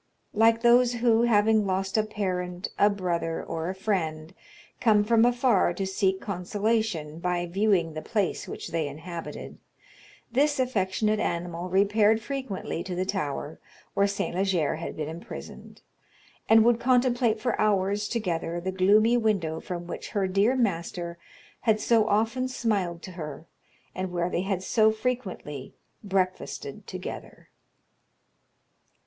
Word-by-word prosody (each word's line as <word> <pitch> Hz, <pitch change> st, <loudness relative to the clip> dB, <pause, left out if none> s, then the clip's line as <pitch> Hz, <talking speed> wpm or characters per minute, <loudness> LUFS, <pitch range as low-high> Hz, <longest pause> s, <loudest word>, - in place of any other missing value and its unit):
Like 225 Hz, +1 st, +4 dB
those 240 Hz, +1 st, +5 dB
who, 235 Hz, -1 st, +3 dB
having 215 Hz, -2 st, +3 dB
lost 190 Hz, 0 st, -1 dB
a 220 Hz, -, +5 dB
parent, 185 Hz, -4 st, -3 dB
a 205 Hz, -, +6 dB
brother, 175 Hz, -4 st, -2 dB
or 165 Hz, +1 st, -4 dB
a 190 Hz, -, -4 dB
friend, 165 Hz, -5 st, -2 dB, 0.5 s
come 215 Hz, -3 st, +4 dB
from 230 Hz, +1 st, +4 dB
afar 240 Hz, -7 st, +3 dB
to 195 Hz, -, -2 dB
seek 190 Hz, 0 st, 0 dB
consolation 195 Hz, -4 st, -2 dB
by 175 Hz, 0 st, -1 dB
viewing 180 Hz, -2 st, +1 dB
the 155 Hz, -, -5 dB
place 205 Hz, -2 st, -1 dB
which -, -, -6 dB
they 160 Hz, -2 st, -1 dB
inhabited, 165 Hz, +4 st, -7 dB, 0.7 s
this 285 Hz, +3 st, +2 dB
affectionate 215 Hz, -3 st, +1 dB
animal 175 Hz, 0 st, -3 dB
repaired 205 Hz, +3 st, +3 dB
frequently 230 Hz, -8 st, -4 dB
to 180 Hz, -, -5 dB
the 185 Hz, +1 st, -1 dB
tower 155 Hz, -6 st, -3 dB, 0.3 s
where 200 Hz, -, +3 dB
St. 200 Hz, -3 st, -2 dB
Leger 180 Hz, -5 st, +1 dB
had 165 Hz, -, -6 dB
been 155 Hz, -1 st, -3 dB
imprisoned, 165 Hz, +3 st, -9 dB, 0.7 s
and 225 Hz, 0 st, +7 dB
would 235 Hz, -1 st, +4 dB
contemplate 245 Hz, -3 st, +2 dB
for 240 Hz, 0 st, 0 dB
hours 205 Hz, 0 st, +1 dB
together 175 Hz, -7 st, -2 dB
the 185 Hz, +2 st, -3 dB
gloomy 210 Hz, +5 st, +4 dB
window 195 Hz, -9 st, 0 dB
from 175 Hz, -1 st, -6 dB
which 175 Hz, -, -6 dB
her 195 Hz, -2 st, 0 dB
dear 200 Hz, +7 st, +2 dB
master 170 Hz, -6 st, -2 dB, 0.4 s
had 220 Hz, -3 st, +2 dB
so 225 Hz, -1 st, +3 dB
often 225 Hz, +5 st, +1 dB
smiled 200 Hz, -9 st, -1 dB
to 185 Hz, -, -7 dB
her, 155 Hz, -3 st, -7 dB, 0.5 s
and 185 Hz, 0 st, -4 dB
where 175 Hz, 0 st, -1 dB
they -, -, 0 dB
had 190 Hz, -1 st, -2 dB
so 220 Hz, +2 st, +4 dB
frequently 215 Hz, -, -4 dB, 0.3 s
breakfasted 190 Hz, -2 st, -2 dB
together." -, -, -8 dB
195 Hz, 140 wpm, -27 LUFS, 175-220 Hz, 0.7 s, and